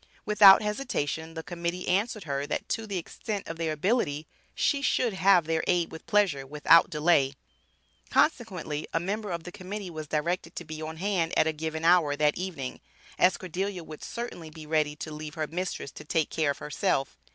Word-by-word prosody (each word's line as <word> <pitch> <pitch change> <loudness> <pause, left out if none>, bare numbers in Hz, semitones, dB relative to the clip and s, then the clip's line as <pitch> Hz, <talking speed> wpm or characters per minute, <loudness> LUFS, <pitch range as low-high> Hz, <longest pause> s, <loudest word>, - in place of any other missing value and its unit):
Without 210 -1 +8
hesitation 165 - -2
the 160 - -5
Committee 175 +1 -4
answered 205 +3 0
her, 140 -1 -2
that - - -3
to 225 -1 -2
the 200 -2 -3
extent 200 +4 -5
of 165 - -6
their 165 -1 -1
ability, 155 - 0 0.3
she 280 -2 +1
should 250 -4 +1
have 190 -3 +4
their 160 0 0
aid 175 -2 +1
with 160 - -10
pleasure, 195 -10 +2
without 150 +3 +5
delay. 150 -3 +2 0.7
Consequently 185 - 0
a - - +4
member 205 +4 -3
of 170 -2 -3
the 180 - -8
Committee 195 0 -6
was 155 -2 -6
directed 165 +3 -2
to 175 - -6
be 155 0 -7
on 160 +1 -6
hand 180 -3 0
at - - +5
a 160 - 0
given 160 +1 -4
hour 165 -4 +5
that 150 0 +2
evening, 170 -8 -5 0.4
as 185 - +4
Cordelia 185 0 -4
would 155 -1 -10
certainly 235 -9 -6
be 155 0 -11
ready 150 -1 +1
to 155 0 -7
leave 150 0 -7
her 155 -1 -1
mistress 170 -2 -4
to - - -10
take 155 +1 0
care 155 -2 +1
of 140 - -1
herself. 150 -3 -1
165 Hz, 190 wpm, -28 LUFS, 155-190 Hz, 0.7 s, Without